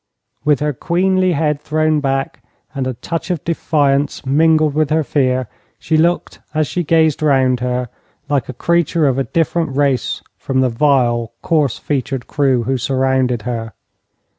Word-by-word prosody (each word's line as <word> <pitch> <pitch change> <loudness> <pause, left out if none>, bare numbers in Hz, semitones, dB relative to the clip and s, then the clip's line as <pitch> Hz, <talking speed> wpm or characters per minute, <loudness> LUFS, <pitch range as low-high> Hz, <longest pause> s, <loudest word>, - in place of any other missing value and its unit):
With 145 -1 +2
her 150 0 0
queenly 185 +5 +1
head 150 -1 0
thrown 155 0 +1
back, 135 -1 -2 0.3
and 135 -3 -2
a 130 - -3
touch 165 +8 -5
of 175 -5 -2
defiance 145 -4 0
mingled 155 +2 +3
with 155 -1 +1
her 155 0 +2
fear, 130 -3 0 0.3
she 160 - -1
looked 170 +3 +1 0.2
as 155 0 +2
she 175 +5 -2
gazed 160 -1 +2
round 130 -4 +2
her 125 0 -2 0.4
like 140 -4 -1
a - - -4
creature 170 +2 +1
of 135 -1 +1
a 135 - 0
different 165 -3 -1
race 140 -4 0 0.2
from 130 -1 0
the 130 - +2
vile, 120 -3 +1
coarse 150 -8 +1
featured 135 -3 -3
crew 135 -5 +1
who 130 +2 -1
surrounded 130 -2 0
her. 115 -2 -4
140 Hz, 160 wpm, -17 LUFS, 130-155 Hz, 0.4 s, mingled